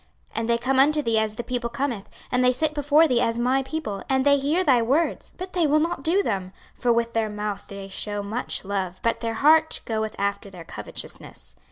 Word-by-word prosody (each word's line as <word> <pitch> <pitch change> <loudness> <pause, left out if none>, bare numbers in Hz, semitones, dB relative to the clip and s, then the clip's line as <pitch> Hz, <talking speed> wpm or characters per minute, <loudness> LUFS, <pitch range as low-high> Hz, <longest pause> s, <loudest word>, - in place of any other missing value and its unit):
26:033:031 - - -3
And 225 0 -2
they 235 - +3
come 260 +3 +1
unto 300 +3 +4
thee 230 -3 +2
as 215 -1 -1
the 240 - -4
people 240 0 -2
cometh, 240 -4 -3 0.2
and 250 0 +2
they 250 - +5
sit 310 +4 0
before 295 +2 +4
thee 245 -3 +2
as 230 -1 +1
my 255 +3 +2
people, 265 -8 -4
and 265 0 +2
they 285 0 +5
hear 305 +7 +1
thy 260 -8 +4
words, 275 +9 0
but 370 0 -7
they 345 -4 +2
will 300 +1 +4
not 335 0 -1
do 350 +7 +2
them: 190 - -2 0.2
for 245 - 0
with 235 0 +1
their 225 -1 0
mouth 210 -1 -4
they 195 -1 -8
shew 205 +1 -2
much 215 +1 -3
love, 190 -2 -3
but 230 - +1
their 230 -1 -3
heart 315 +5 +4
goeth 220 -1 -2
after 200 0 -2
their 180 -3 -11
covetousness. - - -9
240 Hz, 225 wpm, -24 LUFS, 210-285 Hz, 0.2 s, they